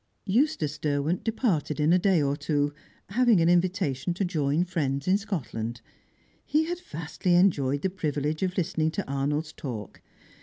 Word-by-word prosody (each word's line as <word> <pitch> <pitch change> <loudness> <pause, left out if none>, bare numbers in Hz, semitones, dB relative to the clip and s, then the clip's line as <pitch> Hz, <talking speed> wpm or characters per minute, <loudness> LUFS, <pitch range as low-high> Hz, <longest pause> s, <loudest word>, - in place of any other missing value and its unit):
Eustace 200 - +1
Derwent 150 +3 0
departed 195 - 0
in 150 +3 +4
a 180 - +5
day 180 -4 +3
or 140 0 +1
two, 145 -1 0 0.4
having 235 -1 +4
an 165 - +3
invitation 175 -4 +1
to 195 - 0
join 155 -1 +1
friends 140 -5 -2
in 185 - +5
Scotland. 130 - -3 0.6
He 305 +1 +2
had 345 +2 -3
vastly 175 - -2
enjoyed 145 -7 +3
the 190 - +1
privilege 150 -4 -2
of 185 -1 -1
listening 160 -3 +1
to 205 - -3
Arnold's 145 +3 -1
talk. 115 -7 -7
160 Hz, 155 wpm, -27 LUFS, 145-190 Hz, 0.6 s, a